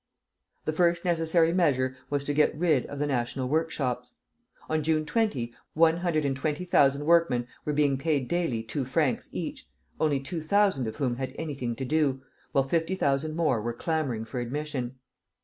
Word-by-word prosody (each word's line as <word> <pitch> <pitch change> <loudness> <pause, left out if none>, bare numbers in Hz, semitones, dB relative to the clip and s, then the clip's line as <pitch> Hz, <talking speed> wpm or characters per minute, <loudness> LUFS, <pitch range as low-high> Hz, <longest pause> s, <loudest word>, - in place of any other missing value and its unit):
The 155 - 0
first 170 +1 +2
necessary 165 -1 +3
measure 130 -8 +2
was 145 -1 0
to 145 - -2
get 150 0 +2
rid 155 -6 +2
of 145 - -7
the 145 - 0
national 130 -1 -1
workshops. 130 -5 -1 0.5
On 155 0 0
June 155 0 +1
20, 155 - 0 0.2
one 165 +1 +5
hundred 170 -4 0
and 135 -1 0
twenty 150 +5 -2
thousand 140 -4 +3
workmen 165 -7 +3 0.2
were 150 - 0
being 140 -2 +2
paid 145 -4 0
daily 165 -10 0
two 135 +5 -3
francs 130 +1 0
each, - - -5 0.3
only 150 -3 +2
two 150 +5 -5
thousand 190 - +2
of 110 - -5
whom 130 -5 -1
had 130 0 -4
anything 140 -7 -3
to 130 - -4
do, 135 -2 +1 0.3
while 135 - +3
fifty 165 +6 0
thousand 150 -1 0
more 155 -9 +1
were 120 +2 -2
clamoring 135 -5 -2
for 125 +3 -5
admission. 130 0 -3
145 Hz, 175 wpm, -28 LUFS, 130-160 Hz, 0.5 s, one